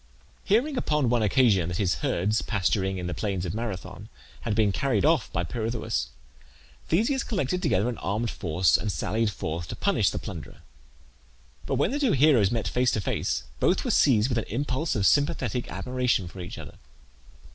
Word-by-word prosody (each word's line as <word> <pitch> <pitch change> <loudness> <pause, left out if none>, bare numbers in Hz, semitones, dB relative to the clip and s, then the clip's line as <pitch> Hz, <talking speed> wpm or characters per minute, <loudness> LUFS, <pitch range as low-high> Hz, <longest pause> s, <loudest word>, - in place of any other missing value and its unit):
Hearing 250 +8 +2
upon 150 - +1
one 120 -2 +2
occasion 105 -5 +3
that 85 - -3
his 95 -4 0
herds, 105 +5 0
pasturing 95 -2 0
in 90 - -4
the 90 - -3
plains 95 -4 -2
of 85 - -3
Marathon, 105 -2 -6 0.3
had 110 -3 -2
been 105 -2 +3
carried 130 +2 0
off 155 -6 +2
by 85 - -1
Pirithoeus, 110 - -2 0.8
Theseus 230 - +1
collected 180 - -1
together 115 - +1
an 120 -3 -3
armed 110 +4 -2
force 90 0 +2
and 105 - -2
sallied 110 +3 0
forth 85 -2 -4
to - - -5
punish - - +2
the - - -4
plunderer. - - -8 1.0
But, - - 0
when 140 - +1
the 285 - -1
two 270 -7 +2
heroes 135 -8 +4
met 115 -1 -1
face 125 0 +2
to - - 0
face, - - -1 0.2
both - - +2
were - - +1
seized 120 -4 +4
with 120 -3 +1
an - - -4
impulse 140 +5 -2
of 100 -3 +1
sympathetic 140 -4 +1
admiration 125 -1 -1
for 90 +3 -11
each 90 - -7
other. - - -10
115 Hz, 180 wpm, -26 LUFS, 95-135 Hz, 1.0 s, heroes